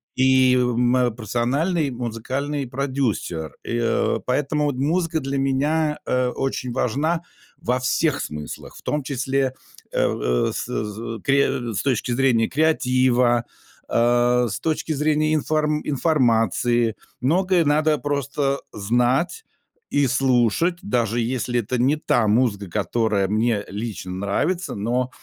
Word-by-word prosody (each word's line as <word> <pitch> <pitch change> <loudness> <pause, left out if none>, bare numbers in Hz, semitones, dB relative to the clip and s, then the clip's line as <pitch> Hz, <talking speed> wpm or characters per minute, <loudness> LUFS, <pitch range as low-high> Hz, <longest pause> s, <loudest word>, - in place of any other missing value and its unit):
и 130 -1 +4
э, - - +3
мое 125 +1 +2
профессиональный 130 - 0
музыкальный 130 +4 -3
продюсер, 125 - -2
и, - - -3
э, 115 - +1
поэтому 145 +3 0
вот 145 -2 0
музыка 160 +4 0
для 135 -1 -3
меня, 150 +3 +1
э, 125 0 +1
очень 130 -1 -3
важна 145 +7 0 0.4
во 125 +2 0
всех 140 +5 +1
смыслах, 75 -1 -7
в - - -12
том 150 -1 -2
числе, 135 -1 -1 0.4
э - - -5
э, - - +1
с - - -3
з 110 +2 -4
кре 135 -4 +1
с 95 - -1
точки 125 -3 0
зрения 120 -3 +2
креатива, 125 -5 +2 0.5
а, 120 +1 +3
с 100 - -4
точки 160 0 -2
зрения 155 +1 +1
инфор 155 0 +1 0.2
информации. 120 -5 +2 0.3
Многое 180 +6 +2
надо 150 +1 +3
просто, 140 -1 -3 0.3
э, - - -10
знать 125 - +1 0.5
и 145 -1 +2
слушать, 130 +6 +2
даже 120 - 0
если 120 0 -1
это 125 +4 -3
не 135 +4 +3
та 120 -7 +1
музыка, 105 -3 +1
которая 105 +1 0
мне 110 0 +1
лично 105 -2 -5
нравится, 100 - -1
но 120 +5 -1
130 Hz, 130 wpm, -22 LUFS, 120-145 Hz, 0.5 s, и